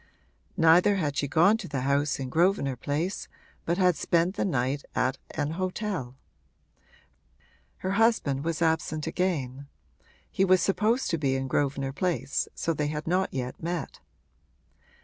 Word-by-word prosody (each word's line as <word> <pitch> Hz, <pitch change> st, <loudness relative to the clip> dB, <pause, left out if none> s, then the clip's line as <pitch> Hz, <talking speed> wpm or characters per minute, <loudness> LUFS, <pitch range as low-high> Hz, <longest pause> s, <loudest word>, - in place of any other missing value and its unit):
Neither 175 Hz, +4 st, +5 dB
had 150 Hz, -7 st, -1 dB
she 140 Hz, -, 0 dB
gone 175 Hz, +10 st, +4 dB
to 225 Hz, -, -7 dB
the 140 Hz, -3 st, -3 dB
house 140 Hz, +2 st, +1 dB
in 130 Hz, -1 st, -4 dB
Grosvenor 165 Hz, -3 st, +2 dB
Place 150 Hz, +9 st, -3 dB, 0.4 s
but 170 Hz, +1 st, 0 dB
had 180 Hz, -3 st, +4 dB
spent 170 Hz, +5 st, +1 dB
the -, -, 0 dB
night 135 Hz, -4 st, -1 dB
at 130 Hz, +1 st, 0 dB, 0.2 s
an 145 Hz, -, -1 dB
hotel. 185 Hz, -, -3 dB, 1.6 s
Her 185 Hz, -, -3 dB
husband 200 Hz, -, +2 dB
was 165 Hz, 0 st, -1 dB
absent 160 Hz, -1 st, 0 dB
again; 145 Hz, -6 st, -2 dB, 0.6 s
he 190 Hz, -, +1 dB
was 185 Hz, -1 st, +5 dB
supposed 215 Hz, +8 st, +1 dB
to 165 Hz, -, 0 dB
be 135 Hz, -2 st, +1 dB
in 135 Hz, 0 st, -2 dB
Grosvenor 135 Hz, 0 st, -1 dB
Place, 175 Hz, -3 st, -1 dB
so 165 Hz, -, -1 dB
that 155 Hz, -, -5 dB
they 150 Hz, -, +1 dB
had 150 Hz, +1 st, -4 dB
not 185 Hz, +3 st, +1 dB
yet 125 Hz, -1 st, -5 dB
met. 170 Hz, -2 st, -4 dB
160 Hz, 150 wpm, -27 LUFS, 140-185 Hz, 1.6 s, Neither